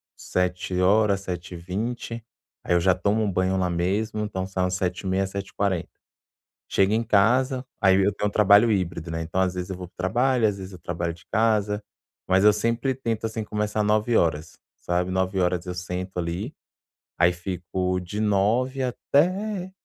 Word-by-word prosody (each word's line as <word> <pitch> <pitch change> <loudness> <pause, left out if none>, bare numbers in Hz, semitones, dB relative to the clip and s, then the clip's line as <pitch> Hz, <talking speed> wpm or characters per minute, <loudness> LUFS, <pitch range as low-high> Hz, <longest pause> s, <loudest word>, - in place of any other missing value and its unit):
7h, 90 +3 +1
7h20, 95 +6 -5 0.4
aí - - 0
eu - - +4
já 90 +2 +4
tomo 105 +2 +1
um 105 - 0
banho 95 +1 +1
lá 90 -1 +1
mesmo, 100 +6 -1
então 100 -3 -3
saio 95 -1 -1
umas 90 0 -1
7h30, 95 +1 -1
7h40. 95 -2 -2 0.8
Chego 95 +1 +3
em 110 - +2
casa, 125 +5 +2 0.2
aí 95 -2 +5
eu 100 +1 +2
tenho 105 - -1
um - - -3
trabalho 105 +2 +6
híbrido, 85 -4 -2
né, 80 0 -3
então, 85 +3 -3
às 95 -1 +2
vezes, 90 +1 -5
eu 95 - -4
vou 90 -1 -7
para 90 - -26
o - - -58
trabalho, 120 +6 +2
às 100 -2 -2
vezes, 95 0 -8
eu 90 - -10
trabalho 85 0 -3
de 85 - -17
casa, 105 -2 +2 0.5
mas 95 +1 +3
eu 105 - +8
sempre 115 +5 0
tento, 115 -4 -3
assim, 110 0 -3
começar 105 0 -1
9h 105 -7 +1 0.2
sabe. 90 +1 -1
9h 95 -1 0
eu 90 - -4
sento 90 +1 -5
ali, 90 - -3 0.6
aí 90 +1 +4
fico 90 +1 -2
de 90 +4 -6
9h 110 +6 +1
até 185 - 0
95 Hz, 170 wpm, -25 LUFS, 90-110 Hz, 0.8 s, eu